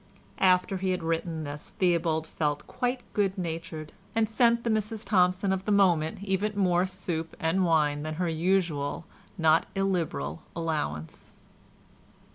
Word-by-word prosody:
After 185 0 +3
he 190 0 -1
had 180 -2 -1
written 165 0 -2
this 145 0 -7
Theobald 170 -3 +2
felt 150 -2 -2
quite 250 0 -2
good 200 -1 +1
natured, 165 -3 -5 0.2
and 225 -1 +3
sent 235 +1 +3
to 235 - -1
the - - +3
Mrs 215 +1 -5
Thompson 185 0 +3
of 190 0 -3
the 210 - 0
moment 180 -4 +3
even 200 +1 -1
more 180 -2 +3
soup 175 -3 -4
and 165 +4 +1
wine 150 -4 +2
than 155 +1 -4
her 180 +2 -1
usual 165 -3 0 0.3
not 160 -1 +4
illiberal 165 - -1
allowance. 150 - -3
175 Hz, 145 wpm, -28 LUFS, 160-195 Hz, 0.3 s, not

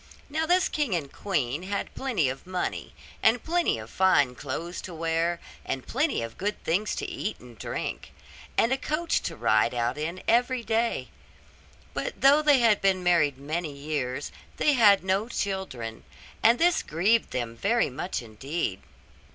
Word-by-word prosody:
Now 315 +2 0
this 365 +2 +4
king 290 - 0
and 145 -5 -4
queen 145 -7 -1
had 200 +2 -4
plenty 235 - 0
of 135 +6 -5
money, 185 -1 -3 0.3
and 225 +1 +3
plenty 345 - +1
of 110 0 -8
fine 145 -6 +3
clothes 150 +7 -5
to 180 - -8
wear, 165 +1 0 0.2
and 130 - -4
plenty 275 - 0
of 115 0 -8
good 205 +2 -2
things 195 +6 0
to - - -3
eat - - -4
and - - -14
drink, - - -5 0.5
and 230 +3 +4
a 265 - -1
coach 310 +4 0
to - - -4
ride - - +2
out 120 +4 -1
in 170 +4 -4
every 245 +1 +2
day: 230 +1 0 0.8
but - - -4
though 280 +3 +6
they 295 -2 +5
had 230 -4 +4
been 190 -2 +2
married 165 -6 +3
many 155 +3 -3
years 140 -2 -3 0.3
they 295 - +3
had 205 -7 +6
no 195 +4 0
children, 190 - -4 0.4
and 230 +2 +6
this 345 +3 +3
grieved 200 +9 +2
them 120 -2 -3
very 215 - +1
much 125 - -3
indeed. 115 - -3
185 Hz, 165 wpm, -27 LUFS, 145-235 Hz, 0.8 s, though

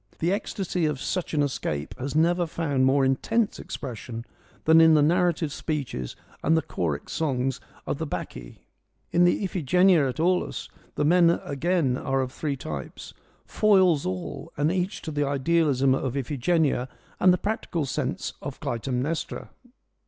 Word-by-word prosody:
The 170 +2 0
ecstasy 190 -5 -1
of 150 -3 -2
such 180 +2 -2
an 145 - +3
escape 75 - -3
has 135 +3 -4
never 170 +2 +3
found 145 -5 0
more 135 0 +3
intense 210 - 0
expression 120 -2 -6 0.4
than 160 +1 +7
in 160 -1 +7
the 150 - +5
narrative 170 -2 +2
speeches 135 - -4 0.3
and 160 +2 +3
the 160 - +1
choric 80 - -3
songs 135 -4 -1 0.2
of - - -3
the - - -3
Bacchae. - - -7 0.5
In 175 +1 +4
the 175 - +2
Iphigenia 180 -3 +3
at 125 - -6
Aulis 180 +2 0 0.3
the 150 - 0
men 170 +2 +5 0.2
again 145 -3 0
are 135 0 0
of 130 -1 -3
three 145 0 -3
types, 75 - -7 0.3
foils 190 -8 +3
all 90 -1 -5
and 145 +3 +2
each 185 +2 -2
to 160 - -4
the 145 -1 0
idealism 140 -2 +2
of 135 0 -2
Iphigenia 140 0 0 0.3
and 185 - +6
the 180 - +3
practical 180 -5 -2
sense 135 +1 -3
of 140 -2 -6
Clytemnestra. 135 +3 -3
150 Hz, 150 wpm, -26 LUFS, 130-170 Hz, 0.5 s, than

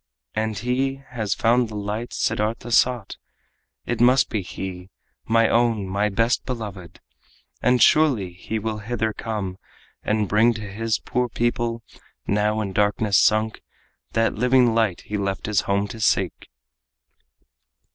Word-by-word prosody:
And 110 -1 -2
he 130 +4 0
has 110 -6 -2
found 120 0 +2
the 110 - -8
light 105 +3 -4
Siddartha 110 +3 -1
sought! 120 -3 +2 0.7
It 120 -1 -2
must 125 +2 +5
be 110 - -1
he 95 0 -7 0.4
my 115 0 +3
own, 115 -4 +2
my 100 +3 0
best 115 +4 +1
beloved! 105 -8 -7 0.6
And 125 0 +4
surely 125 - +3
he 95 +5 -5
will 110 0 -3
hither 110 0 -2
come, 100 -5 -4 0.4
and 105 -1 0
bring 115 +4 +3
To 110 - -6
his 110 +2 -2
poor 125 0 -2
people, 120 0 -1 0.4
now 105 +2 +1
in 100 -2 -4
darkness 105 0 +2
sunk, 110 +1 +2 0.5
That 115 0 +2
living 125 0 +3
light 110 -6 +1
he 105 0 -4
left 100 -1 -2
his 105 -4 +1
home 100 +1 +1
to 115 - -8
seek." 110 - 0
110 Hz, 140 wpm, -23 LUFS, 105-120 Hz, 0.7 s, must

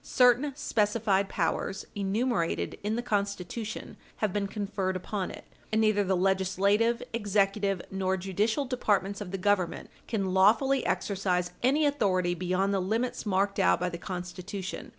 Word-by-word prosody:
Certain 250 +3 +4
specified 205 -6 +1
powers, 180 +2 -1
enumerated 205 -1 -1
in 210 +2 0
the 240 - -2
Constitution, 205 0 -3 0.2
have 210 -4 -1
been 205 -1 0
conferred 195 -2 -2
upon 185 +1 -3
it, - - -9 0.3
and 220 - +2
neither 215 -2 +3
the 190 -1 +1
legislative, 195 +5 +2
executive, 200 -3 +1
nor 190 0 0
judicial 205 +8 0
departments 205 -6 0
of 200 - -5
the 195 - -3
Government 190 -2 0 0.2
can 195 -5 -1
lawfully 230 +8 +4
exercise 180 -3 0
any 280 +5 +3
authority 190 -11 +1
beyond 185 +3 0
the 195 - +2
limits 225 +5 -1
marked 200 0 +1
out 90 0 +4
by 180 - 0
the 170 -1 -7
Constitution. 185 +2 -6
200 Hz, 145 wpm, -29 LUFS, 185-220 Hz, 0.3 s, Certain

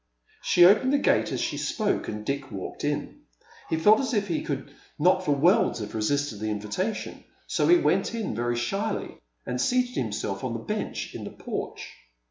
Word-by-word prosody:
She 175 - +6
opened 210 +8 +5
the - - +5
gate - - +2
as - - -2
she - - -2
spoke, 215 -2 -1
and 105 0 -5
Dick 140 +1 -3
walked 95 -2 -6
in. - - -3 0.5
He 160 - +1
felt 210 +7 +6
as 260 -3 -1
if 205 -1 +1
he 170 - 0
could 145 0 -4 0.2
not 185 +4 +3
for 150 - +2
worlds 170 +8 +3
have 105 -2 -6
resisted 120 +1 -1
the 110 0 -2
invitation, 105 - -3 0.2
so - - +1
he 350 - +7
went 285 - +1
in, 225 - -2
very 120 +2 -1
shyly, 195 - -2 0.3
and 125 0 -2
seated 250 0 +1
himself 105 -4 -2
on 125 -3 -2
the 115 - -3
bench 115 - -4
in - - -6
the - - -5
porch. - - -6
145 Hz, 190 wpm, -26 LUFS, -, 0.5 s, he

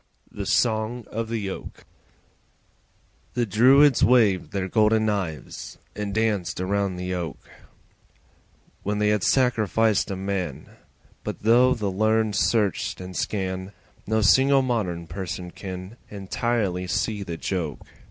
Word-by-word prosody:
The 100 -2 -5
Song 110 +2 +1
of 115 0 -3
the 110 -4 -2
Oak - - -9 1.5
The 120 -1 +1
Druids 130 +6 +5
waved 100 -10 +4
their 95 -2 -2
golden 110 +2 +3
knives 95 -9 -4 0.2
And 105 -1 -3
danced 105 -5 0
around 100 0 0
the 90 +1 -4
Oak 85 -6 -4 1.4
When 105 +1 -2
they 105 0 +2
had 105 -1 +2
sacrificed 110 -4 +2
a 95 - -2
man; 95 -7 -4 0.5
But - - -6
though 125 +3 +5
the 105 -4 -2
learned 110 +2 +1
search 105 -1 +1
and 90 0 -8
scan, 95 -1 -3 0.3
No 110 +1 +1
single 135 +7 +5
modern 95 -9 -1
person 90 0 -6
can 95 +4 -8
Entirely 100 -2 -2
see 105 +2 -1
the 85 -4 -5
joke. 80 -6 -3
100 Hz, 125 wpm, -24 LUFS, 95-110 Hz, 1.5 s, Druids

